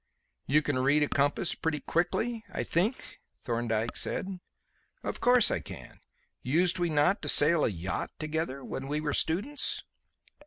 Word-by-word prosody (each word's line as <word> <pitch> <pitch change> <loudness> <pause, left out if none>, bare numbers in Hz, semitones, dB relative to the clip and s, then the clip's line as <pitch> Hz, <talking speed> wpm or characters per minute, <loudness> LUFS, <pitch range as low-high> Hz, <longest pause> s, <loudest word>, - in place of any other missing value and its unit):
"You 150 +2 +3
can 145 -3 -1
read 140 +3 +3
a - - +1
compass 145 +5 0
pretty 160 -2 -2
quickly, 220 - -1
I - - -3
think?" 200 +10 -1 0.2
Thorndyke 115 -1 -2
said. 190 -1 -2 0.6
"Of - - -5
course 245 -2 +5
I - - 0
can. - - -11 0.4
Used 175 +8 +2
we 175 -1 +1
not 155 +6 +2
to 150 - -2
sail 155 +3 +6
a - - +3
yacht 90 -1 -4
together 155 -3 -3
when 135 - -5
we 150 +2 -1
were 150 -1 -2
students?" 215 - -1
155 Hz, 155 wpm, -29 LUFS, 140-180 Hz, 0.6 s, sail